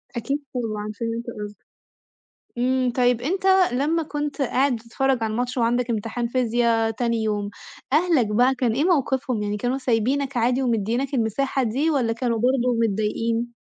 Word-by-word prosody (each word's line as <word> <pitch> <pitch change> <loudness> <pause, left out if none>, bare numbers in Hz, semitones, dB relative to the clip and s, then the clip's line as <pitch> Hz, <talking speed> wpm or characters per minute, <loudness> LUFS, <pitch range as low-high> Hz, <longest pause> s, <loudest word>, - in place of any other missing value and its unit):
أكيد 275 +5 -2
طبعًا، 215 -3 -3
فهمت 230 0 -3
قصدك. 210 0 -6 1.0
إمم، 255 0 +1
طيب 245 -2 +2
أنت 370 +8 -2 0.3
لمّا 310 +5 +1
كنت 295 -1 -4
قاعد 265 0 +2
بتتفرّج 235 +2 -1
على 220 - -1
الماتش 245 +3 -2
وعندك 240 +1 +1
امتحان 230 +2 -2
فيزيا 230 -2 +1
تاني 230 0 -1
يوم، 205 -1 -1 0.4
أهلك 310 -8 +3
بقى 245 +5 +3
كان 245 -3 0
إيه 280 +6 +1
موقفهم؟ 265 - +1
يعني 205 0 -2
كانوا 245 +4 -1
سايبينك 260 +2 0
عادي 245 +3 +2
ومديينك 235 +4 -1
المساحة 260 +3 0
دي، 270 +8 0
والّا 240 -6 +1
كانوا 230 -1 -1
برضو 250 +1 +2
متضايقين؟ 230 +3 -1
245 Hz, 150 wpm, -23 LUFS, 225-265 Hz, 1.0 s, أهلك